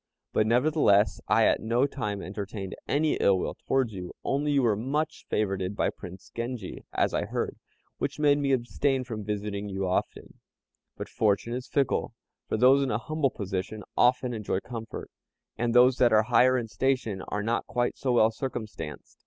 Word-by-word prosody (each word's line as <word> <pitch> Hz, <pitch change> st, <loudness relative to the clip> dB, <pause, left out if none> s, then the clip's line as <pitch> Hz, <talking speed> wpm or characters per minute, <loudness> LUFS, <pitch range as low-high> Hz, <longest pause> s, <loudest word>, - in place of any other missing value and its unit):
But 110 Hz, -, +2 dB
nevertheless 120 Hz, -4 st, +3 dB
I -, -, +4 dB
at -, -, +3 dB
no 120 Hz, +4 st, +2 dB
time 105 Hz, -8 st, -3 dB
entertained 100 Hz, 0 st, -5 dB
any 150 Hz, +2 st, +1 dB
ill 95 Hz, -1 st, +4 dB
will -, -, -2 dB
towards 130 Hz, -5 st, -1 dB
you, 90 Hz, -2 st, -7 dB
only 145 Hz, +2 st, 0 dB
you 140 Hz, -2 st, +3 dB
were 110 Hz, -3 st, +3 dB
much 145 Hz, +8 st, -2 dB
favored 95 Hz, -2 st, -1 dB
by -, -, +1 dB
Prince 95 Hz, 0 st, -11 dB
Genji, 115 Hz, -4 st, -5 dB
as -, -, +1 dB
I -, -, 0 dB
heard, -, -, -3 dB, 0.4 s
which 140 Hz, 0 st, -2 dB
made 145 Hz, -1 st, +4 dB
me 140 Hz, -1 st, +1 dB
abstain 130 Hz, +1 st, +1 dB
from 110 Hz, -4 st, -6 dB
visiting 105 Hz, 0 st, -3 dB
you 95 Hz, -1 st, -2 dB
often; 90 Hz, -, -3 dB, 0.6 s
but -, -, -5 dB
fortune 110 Hz, +2 st, 0 dB
is 125 Hz, +1 st, -4 dB
fickle, 140 Hz, -3 st, 0 dB, 0.3 s
for -, -, 0 dB
those 130 Hz, +4 st, +6 dB
in 135 Hz, -, 0 dB
a 105 Hz, -, +1 dB
humble 155 Hz, +3 st, 0 dB
position 100 Hz, -1 st, -4 dB
often 125 Hz, 0 st, +3 dB
enjoy 105 Hz, -4 st, -2 dB
comfort, 115 Hz, -2 st, -7 dB, 0.4 s
and 120 Hz, +1 st, -1 dB
those 125 Hz, +1 st, +6 dB
that 120 Hz, -2 st, +4 dB
are 110 Hz, 0 st, +5 dB
higher 125 Hz, +2 st, +4 dB
in 120 Hz, -2 st, -2 dB
station 115 Hz, -4 st, -1 dB
are 105 Hz, 0 st, -2 dB
not 115 Hz, +2 st, -1 dB
quite 120 Hz, 0 st, 0 dB
so 130 Hz, -, -1 dB
well 110 Hz, -2 st, +5 dB
circumstanced. 110 Hz, -, -6 dB
115 Hz, 180 wpm, -27 LUFS, 105-130 Hz, 0.6 s, those